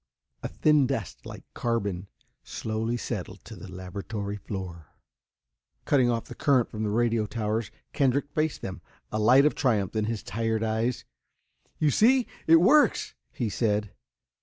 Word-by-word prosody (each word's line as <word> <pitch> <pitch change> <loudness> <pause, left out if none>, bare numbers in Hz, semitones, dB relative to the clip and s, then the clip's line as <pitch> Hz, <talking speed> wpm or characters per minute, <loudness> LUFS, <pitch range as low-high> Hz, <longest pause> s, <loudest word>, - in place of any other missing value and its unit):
A - - -3
thin 150 -3 +3
dust, 115 - -4
like - - -9
carbon, 100 -6 -2 0.4
slowly 110 +2 -3
settled 100 -5 -6
to 110 - -9
the 95 0 -10
laboratory 100 +3 -5
floor. 90 -6 -7 1.0
Cutting 130 -4 +3
off 115 -1 -1
the - - -9
current 130 -5 +2
from 110 - -5
the 110 - 0
radio 115 0 +1
towers, 110 0 -2 0.2
Kendrick 140 0 +1
faced 155 +1 -1
them, 95 -2 -6 0.3
a 110 - -1
light 125 +6 +6
of 150 - +3
triumph 110 -7 0
in 110 -1 +1
his 115 -1 -3
tired 115 +2 -1
eyes. 110 +2 -1 0.7
"You 150 -2 +2
see 245 - +4 0.2
it 165 - +8
works," 260 - +4 0.2
he 120 - -2
said. 105 -1 0
115 Hz, 150 wpm, -27 LUFS, 105-130 Hz, 1.0 s, it